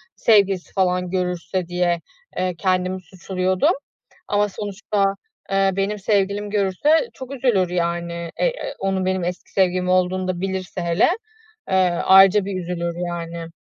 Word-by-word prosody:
sevgilisi 200 Hz, -4 st, +3 dB
falan 180 Hz, -1 st, +1 dB
görürse 180 Hz, 0 st, -2 dB
diye, 175 Hz, -1 st, 0 dB, 0.4 s
eee, 185 Hz, -1 st, -1 dB
kendimi 185 Hz, +1 st, 0 dB
suçluyordum. 185 Hz, +1 st, 0 dB, 0.5 s
Ama 205 Hz, 0 st, +1 dB
sonuçta, 200 Hz, 0 st, -1 dB, 0.4 s
eee, 195 Hz, 0 st, +3 dB
benim 200 Hz, +1 st, -1 dB
sevgilim 205 Hz, 0 st, 0 dB
görürse 210 Hz, -, +2 dB
çok 265 Hz, +1 st, -8 dB
üzülür, 230 Hz, -9 st, +2 dB
yani. 170 Hz, -1 st, -2 dB
Ey, -, -, +2 dB
eee, -, -, -6 dB
onun 190 Hz, -1 st, -1 dB
benim 185 Hz, -1 st, 0 dB
eski 180 Hz, +1 st, -5 dB
sevgilim 185 Hz, -1 st, +1 dB
olduğunu 185 Hz, 0 st, +1 dB
da 180 Hz, -1 st, -2 dB
bilirse 190 Hz, -2 st, -3 dB
hele, 170 Hz, -, +3 dB, 0.6 s
eee, -, -, +1 dB, 0.3 s
ayrıca 195 Hz, +1 st, +7 dB
bir 195 Hz, -2 st, -3 dB
üzülür 170 Hz, -1 st, -3 dB
yani. 170 Hz, -1 st, -5 dB
185 Hz, 135 wpm, -22 LUFS, 180-195 Hz, 0.6 s, ayrıca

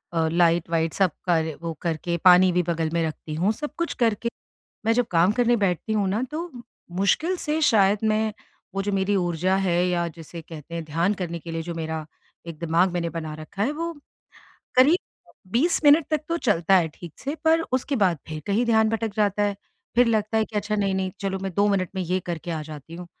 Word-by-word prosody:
अ, 165 Hz, -1 st, +2 dB
light-white 165 Hz, -1 st, +2 dB
सब 190 Hz, -3 st, +2 dB
कर 165 Hz, -3 st, +2 dB, 0.2 s
वो 165 Hz, -1 st, -3 dB
करके 170 Hz, 0 st, -2 dB
पानी 180 Hz, 0 st, +7 dB
भी 180 Hz, 0 st, +2 dB
बगल 165 Hz, -2 st, -1 dB
में 170 Hz, -1 st, +1 dB
रखती 155 Hz, 0 st, -7 dB
हूँ 185 Hz, +6 st, +2 dB
सब 295 Hz, +7 st, -5 dB
कुछ 340 Hz, 0 st, -1 dB
करके 230 Hz, +1 st, +1 dB, 0.6 s
मैं 225 Hz, -, +4 dB
जब 245 Hz, 0 st, +2 dB
काम 175 Hz, +3 st, +4 dB
करने 240 Hz, +1 st, +3 dB
बैठती 200 Hz, +1 st, 0 dB
हूँ 205 Hz, -2 st, +1 dB
ना 210 Hz, +5 st, 0 dB
तो 335 Hz, +3 st, -4 dB, 0.5 s
मुश्किल 320 Hz, -, +2 dB
से 315 Hz, -2 st, -2 dB
शायद 205 Hz, -6 st, +4 dB
मैं 215 Hz, 0 st, +1 dB, 0.4 s
वो 195 Hz, -, -1 dB
जो 205 Hz, 0 st, -2 dB
मेरी 195 Hz, +1 st, +1 dB
ऊर्जा 175 Hz, 0 st, +1 dB
है 185 Hz, -3 st, +1 dB
या 175 Hz, -1 st, 0 dB
जिसे 165 Hz, +1 st, -9 dB
कहते 160 Hz, +1 st, -10 dB
हैं 165 Hz, -, -4 dB
ध्यान 165 Hz, +6 st, 0 dB
करने 175 Hz, -3 st, -4 dB
के 165 Hz, +1 st, -9 dB
लिए 165 Hz, 0 st, -3 dB
जो 170 Hz, +1 st, -5 dB
मेरा 160 Hz, -1 st, -4 dB, 0.4 s
एक 165 Hz, -2 st, -7 dB
दिमाग़ 170 Hz, +3 st, +2 dB
मैंने 170 Hz, -1 st, -1 dB
बना 160 Hz, -2 st, -5 dB
रखा 155 Hz, +6 st, -6 dB
है 260 Hz, +7 st, +1 dB
वो 335 Hz, +2 st, -3 dB, 0.8 s
करीब 285 Hz, +8 st, +6 dB, 0.5 s
20 310 Hz, +10 st, +2 dB
मिनट 295 Hz, +1 st, +6 dB
तक 310 Hz, -2 st, +1 dB
तो 335 Hz, -, 0 dB
चलता 195 Hz, -, +3 dB
है 170 Hz, -3 st, +2 dB
ठीक 170 Hz, -3 st, -10 dB
से। 280 Hz, +2 st, -3 dB
पर 320 Hz, +1 st, +4 dB
उसके 260 Hz, +2 st, 0 dB
बाद 185 Hz, -7 st, +2 dB
फ़िर 155 Hz, -1 st, -5 dB
कहीं 205 Hz, +4 st, +2 dB
ध्यान 220 Hz, -1 st, +4 dB
भटक 225 Hz, -1 st, -2 dB
जाता 205 Hz, -1 st, +2 dB
है। 205 Hz, -1 st, +1 dB, 0.4 s
फ़िर 245 Hz, +1 st, +5 dB
लगता 220 Hz, -1 st, +1 dB
है 220 Hz, -, +2 dB
कि 215 Hz, -, -8 dB
अच्छा 210 Hz, +1 st, -1 dB
नहीं-नहीं 190 Hz, -2 st, 0 dB
चलो 195 Hz, -1 st, -2 dB
मैं 195 Hz, -1 st, -3 dB
2 200 Hz, +3 st, +3 dB
मिनट 185 Hz, -4 st, 0 dB
में 190 Hz, -, -1 dB
ये 180 Hz, +2 st, -1 dB
करके 170 Hz, 0 st, -4 dB
आ 160 Hz, -2 st, -2 dB
जाती 150 Hz, +1 st, -10 dB
हूँ। 175 Hz, +1 st, -8 dB
190 Hz, 215 wpm, -24 LUFS, 170-220 Hz, 0.8 s, पानी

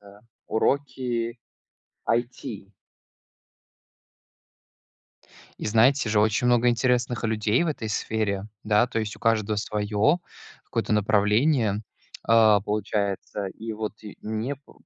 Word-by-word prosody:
это 100 Hz, 0 st, -16 dB, 0.3 s
Уроки 120 Hz, -2 st, -1 dB, 0.7 s
IT. 115 Hz, -3 st, -2 dB, 2.9 s
И, -, -, -4 dB
знаете 115 Hz, +3 st, +3 dB
же, 105 Hz, -1 st, +3 dB
очень 110 Hz, +3 st, +2 dB
много 120 Hz, 0 st, +4 dB
интересных 120 Hz, 0 st, +1 dB
людей 110 Hz, +4 st, +1 dB
в -, -, 0 dB
этой 115 Hz, -7 st, -3 dB
сфере, 105 Hz, -2 st, -1 dB, 0.2 s
да, 105 Hz, +3 st, +3 dB
то 115 Hz, -, -3 dB
есть 110 Hz, -1 st, -3 dB
у -, -, -19 dB
каждого 110 Hz, -2 st, +1 dB
своё 105 Hz, +9 st, +1 dB, 0.5 s
какое-то 115 Hz, -3 st, -2 dB
направление, 105 Hz, +2 st, +2 dB, 0.4 s
а, 110 Hz, -3 st, +5 dB
получается. 100 Hz, -1 st, -2 dB
И 110 Hz, 0 st, -5 dB
вот 110 Hz, 0 st, -4 dB
и 105 Hz, -, -10 dB
мне 110 Hz, +6 st, -3 dB
п 140 Hz, -, -21 dB
110 Hz, 115 wpm, -25 LUFS, 105-120 Hz, 2.9 s, а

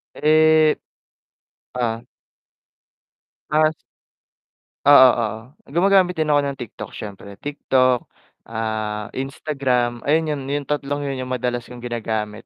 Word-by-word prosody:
Eh, 155 Hz, 0 st, +4 dB, 1.0 s
oh. 115 Hz, -2 st, -2 dB, 1.5 s
Ah, 155 Hz, +1 st, +4 dB
s -, -, -15 dB, 1.1 s
Oo, 140 Hz, -2 st, +9 dB
oo. 110 Hz, -, +1 dB, 0.5 s
Gumagamit 185 Hz, +1 st, +4 dB
din 155 Hz, -1 st, 0 dB
ako 145 Hz, -1 st, +4 dB
ng 140 Hz, -1 st, -4 dB
TikTok 120 Hz, -, -7 dB
syempre. 100 Hz, -1 st, -9 dB
TikTok, 130 Hz, -3 st, +1 dB, 0.4 s
ah, 110 Hz, -2 st, -3 dB
Instagram, 130 Hz, -3 st, -1 dB
ayun 155 Hz, +2 st, +2 dB
yun 145 Hz, -2 st, -2 dB
yung 140 Hz, 0 st, -3 dB
tatlong 145 Hz, -1 st, -2 dB
yun 135 Hz, -, -3 dB
yung 130 Hz, -, -4 dB
madalas 120 Hz, -1 st, -2 dB
kong 125 Hz, 0 st, -11 dB
ginagamit. 110 Hz, -3 st, -4 dB
130 Hz, 115 wpm, -21 LUFS, 115-150 Hz, 1.5 s, Oo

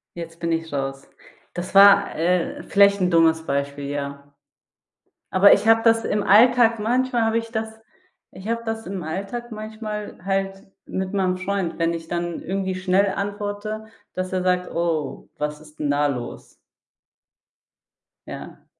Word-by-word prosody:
Jetzt 165 Hz, -1 st, -8 dB
bin 170 Hz, -1 st, -2 dB
ich 165 Hz, -1 st, -2 dB
raus. 135 Hz, -1 st, -4 dB, 0.5 s
Das 180 Hz, +2 st, -6 dB
war, 200 Hz, 0 st, +7 dB
äh, 175 Hz, +2 st, 0 dB
vielleicht 200 Hz, 0 st, +4 dB
'n 180 Hz, 0 st, +2 dB
dummes 160 Hz, -1 st, +3 dB
Beispiel, 140 Hz, 0 st, -2 dB
ja. 140 Hz, 0 st, -6 dB, 1.0 s
Aber 195 Hz, +2 st, +7 dB
ich -, -, +1 dB
habe 225 Hz, 0 st, +6 dB
das 225 Hz, -1 st, +3 dB
im 205 Hz, 0 st, 0 dB
Alltag 230 Hz, +2 st, +5 dB
manchmal 245 Hz, +2 st, +1 dB
habe 225 Hz, 0 st, +1 dB
ich 230 Hz, 0 st, -4 dB
das 220 Hz, -1 st, -4 dB, 0.5 s
ich 190 Hz, +2 st, -10 dB
habe 230 Hz, 0 st, -2 dB
das 225 Hz, 0 st, -4 dB
im 190 Hz, -1 st, -5 dB
Alltag 200 Hz, +9 st, -5 dB
manchmal 215 Hz, -1 st, -6 dB
halt 195 Hz, 0 st, -2 dB, 0.2 s
mit 190 Hz, +1 st, -4 dB
meinem 185 Hz, -2 st, +1 dB
Freund, 185 Hz, -2 st, -3 dB
wenn 165 Hz, 0 st, +1 dB
ich 165 Hz, -1 st, -8 dB
dann 175 Hz, 0 st, -3 dB
irgendwie 190 Hz, 0 st, -2 dB
schnell 185 Hz, +1 st, +1 dB
antworte, 205 Hz, +2 st, -4 dB, 0.3 s
dass 185 Hz, 0 st, -4 dB
er 185 Hz, -1 st, 0 dB
sagt: 180 Hz, 0 st, +1 dB
„Oh, 165 Hz, -4 st, -2 dB
was 150 Hz, 0 st, -3 dB
ist 155 Hz, 0 st, -18 dB
'n 145 Hz, -, -1 dB
da 145 Hz, +1 st, +2 dB
los?“ 125 Hz, -4 st, -6 dB, 1.7 s
Ja. -, -, -9 dB
190 Hz, 155 wpm, -23 LUFS, 165-215 Hz, 1.7 s, war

